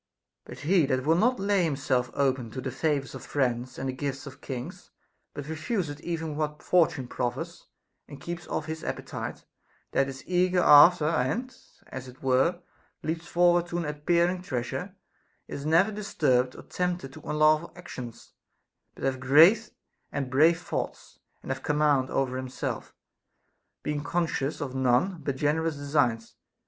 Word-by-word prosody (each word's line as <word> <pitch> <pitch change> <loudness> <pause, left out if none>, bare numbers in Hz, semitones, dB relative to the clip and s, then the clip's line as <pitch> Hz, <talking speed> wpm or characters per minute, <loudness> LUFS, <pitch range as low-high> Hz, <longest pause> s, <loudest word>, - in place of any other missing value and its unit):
But - - -10
he 165 -1 +3
that 130 0 0
will 160 - +4
not 245 +8 +2
lay 200 -1 +2
himself 135 -5 0
open 130 -4 +1
to - - -5
the 130 0 -4
favors 140 0 -1
of - - -8
friends 125 -3 -1
and 135 - -3
the 130 - -2
gifts 135 +1 -4
of 140 -1 -11
kings, 125 -3 -7 0.5
but 145 - -5
refuseth 160 -1 -3
even 160 -3 -3
what 150 0 -3
Fortune 160 -7 +2
prof 120 -1 -2
fers, 170 +5 -8 0.4
and 145 - -10
keeps 175 0 -6
otf 155 - -2
his 160 0 -5
appetite, - - -5 0.5
that 135 - +2
is 130 0 -8
eager 180 0 +2
after 150 +2 +8
and 170 - 0 0.3
(as 130 0 -8
it 130 +1 -14
were) 135 +7 +2 0.4
leaps 165 +2 -3
forward 175 0 +3
to 175 - -3
an 170 - -2
appearing 170 +4 +1
treasure, 125 -8 -4 0.5
is 140 +1 -5
never 170 +7 +4
disturbed 135 -11 +1
or - - -10
tempted 175 -7 -3
to - - -11
unlawful 155 +2 +2
actions, 130 -10 -9 0.6
but - - -11
hath 135 -1 0
great 165 - +6 0.4
and 135 -2 -3
brave 160 +5 +5
thoughts, 175 - -5 0.2
and - - -4
hath - - -3
command 150 -3 +2
over 130 -1 0
himself, 130 0 -5 0.9
being 145 -1 -2
conscious 160 -2 -1
of 135 -3 -4
none 130 +8 +1
but 140 - -2
generous 155 +3 0
designs. 140 -6 0
150 Hz, 155 wpm, -27 LUFS, 130-170 Hz, 0.9 s, after